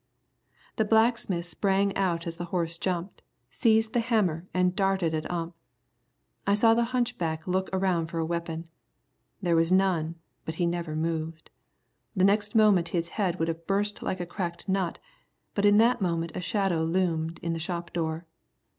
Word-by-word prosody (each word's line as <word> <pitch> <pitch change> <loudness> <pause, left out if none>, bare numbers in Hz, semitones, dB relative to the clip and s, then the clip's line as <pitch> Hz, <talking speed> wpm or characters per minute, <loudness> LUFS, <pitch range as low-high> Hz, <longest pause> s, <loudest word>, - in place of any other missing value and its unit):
The 220 - +3
blacksmith 220 -5 +2
sprang 195 +3 +1
out 175 -4 0
as 165 -1 -4
the 175 - -4
horse 170 -1 -2
jumped, 180 0 -3 0.3
seized 220 -2 +2
the 240 - +3
hammer 200 -8 0
and 180 0 +1
darted 195 -4 +1
at 155 0 -2
Ump. 170 -1 -3 0.9
I 200 - +4
saw 225 +2 +5
the 235 +1 +2
hunchback 230 -11 -2
look 185 +1 0
around 185 -3 +1
for 170 - -6
a 165 - 0
weapon. 170 0 -4 0.8
There 170 -2 +2
was 165 +1 +3
none, 180 -4 +2 0.3
but 160 - -5
he 175 - 0
never 170 -2 -2
moved. 160 0 -3 0.6
The 185 - +2
next 205 +2 +2
moment 205 -6 +5
his 170 0 -2
head 185 -5 -1
would 165 - 0
have 165 0 -4
burst 205 +1 0
like 185 - -2
a 175 - -2
cracked 175 0 -5
nut, 190 -3 0 0.6
but 200 - +1
in 205 0 +6
that 230 +1 +4
moment 170 -2 -1
a - - -4
shadow 195 -5 0
loomed 165 -1 0
in 170 0 -1
the 165 - -3
shop 170 +1 -4
door. 160 0 -2
175 Hz, 170 wpm, -27 LUFS, 165-200 Hz, 0.9 s, in